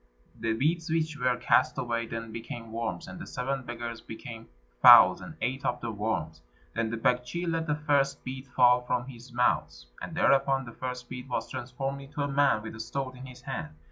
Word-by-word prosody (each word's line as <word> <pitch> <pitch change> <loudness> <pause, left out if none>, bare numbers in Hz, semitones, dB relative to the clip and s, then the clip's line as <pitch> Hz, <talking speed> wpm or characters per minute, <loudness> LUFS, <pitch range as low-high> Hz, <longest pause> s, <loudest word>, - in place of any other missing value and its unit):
The 115 -1 0
beads 160 +8 0
which 160 -1 0
were 125 -1 +2
cast - - +3
away 115 -1 -1
then 115 0 -5
became 115 0 -7
worms, 110 -6 -3
and 95 - -8
the - - -8
seven 135 +2 -2
beggars 120 -2 -6
became 115 0 -9 0.3
fowls - - +9
and - - -9
ate 130 +2 -1
up 125 - 0
the 120 -1 -4
worms. 100 -7 -3 0.3
Then 115 0 -1
the 115 - -3
Baktschi 125 +9 0
let 165 -1 -1
the 150 - +1
first 140 -2 +1
bead 130 +1 -6
fall 125 -1 +5
from 125 0 -1
his 125 -1 -11
mouth, 125 +1 +1 0.2
and - - -6
thereupon 135 -1 +3
the 120 - -8
first 125 +1 -5
bead 125 +1 -8
was 115 -2 -3
transformed 135 +3 -4
into 145 +1 -4
a - - 0
man 140 -6 +2
with 110 - -7
a - - -10
sword 130 +3 -4
in 130 +1 -9
his 125 -1 -12
hand. 105 - -5
125 Hz, 205 wpm, -29 LUFS, 115-135 Hz, 0.3 s, fowls